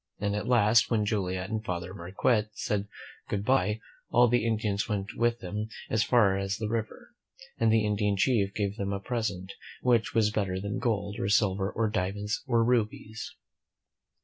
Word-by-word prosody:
And 100 0 -1
at 105 - -3
last, 115 -1 +4
when 110 -3 +1
Joliet 95 -2 -2
and 110 0 -2
Father 90 -2 -4
Marquette 100 +4 0
said 105 -1 -1 0.4
good 100 0 -2
by, 110 -4 +2 0.3
all 120 +1 +5
the 120 -1 +2
Indians 105 -2 -1
went 105 +1 -3
with 120 0 +1
them 105 +4 -4 0.2
as 110 -1 +3
far 110 -6 +4
as 100 0 -2
the 110 - -3
river, 115 - -4 0.5
and 115 -1 +4
the 110 -1 +3
Indian 105 -1 +1
chief 100 -2 +2
gave 100 0 -1
them 100 -1 -2
a 100 - -2
present, 100 -5 -3 0.3
which 120 -3 +2
was 110 -2 +3
better 95 -3 -1
than 100 +1 -3
gold, 100 -3 -1
or 100 - -1
silver, 100 -2 +2
or 115 0 0
diamonds, 105 +4 -2
or 115 -3 +3
rubies. 115 +5 -1
105 Hz, 175 wpm, -28 LUFS, 100-115 Hz, 0.5 s, all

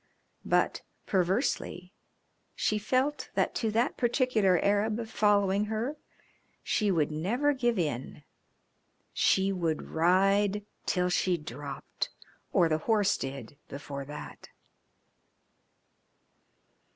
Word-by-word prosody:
But, - - +1 0.2
perversely, 185 -1 -1 0.6
she 215 - 0
felt 260 +7 0
that - - +1
to 225 - -1
that 230 +3 0
particular 235 -7 +2
Arab 210 +4 +1
following 205 -2 +2
her 220 +7 -2 0.7
she 210 -2 +1
would 160 -5 +1
never 235 - +1
give 240 -4 0
in. 145 -4 -3 0.9
She 195 0 +3
would 165 -4 -2
ride 195 +4 +3 0.2
till 180 -1 +1
she 180 0 +2
dropped, 140 -1 -6 0.4
or 170 - +4
the 155 -1 0
horse 210 -3 +3
did, 135 -1 -6
before 140 0 -7
that. 150 +1 -9
195 Hz, 100 wpm, -29 LUFS, 160-220 Hz, 0.9 s, or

